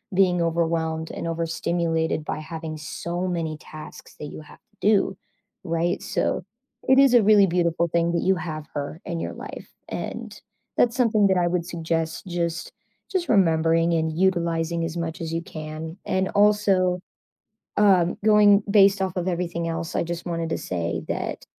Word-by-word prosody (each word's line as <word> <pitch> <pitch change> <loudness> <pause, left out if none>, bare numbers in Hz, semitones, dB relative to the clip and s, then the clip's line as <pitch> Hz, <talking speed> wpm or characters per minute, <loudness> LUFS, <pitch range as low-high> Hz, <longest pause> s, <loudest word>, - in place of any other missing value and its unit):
being 180 -2 +3
overwhelmed 165 -1 0
and - - -5
overstimulated 165 -1 -1
by - - -3
having 160 0 -6
so 170 +4 -4
many 165 -3 -2
tasks 155 0 -11
that - - -5
you 150 - -8
have 155 - -15
to 210 - -41
do, 200 -3 +3 0.5
right, 170 +1 0
so - - -1 0.4
it 265 0 +6
is 275 -2 +6
a 240 - +7
really 205 -1 +6
beautiful 170 -1 +1
thing 170 +1 +1
that 170 - +1
you 190 +1 +3
have 155 -3 -5
her 145 +2 -4
in 170 -3 -3
your - - -4
life, - - -9 0.2
and - - -6 0.4
that's 235 -1 +3
something 220 -5 +3
that 190 -1 +2
I 175 - +2
would 175 -1 -1
suggest 165 -1 -2
just 170 -1 -2 0.4
just 375 -3 -1
remembering 165 -3 +3
and 160 0 0
utilizing 170 -2 +1
as 165 0 -5
much 165 -1 -3
as 165 -1 -4
you 165 - -1
can 160 -1 -7
and 190 -2 0
also, 200 -3 +3 0.8
um, 185 -4 +4
going 210 -1 +6
based 200 -1 +5
off 190 -1 -2
of 180 0 -1
everything 170 -1 -2
else, 165 0 -4
I - - +1
just 170 0 -5
wanted 165 -2 -2
to - - -1
say 85 -2 -3
that - - -3
170 Hz, 170 wpm, -24 LUFS, 165-190 Hz, 0.8 s, a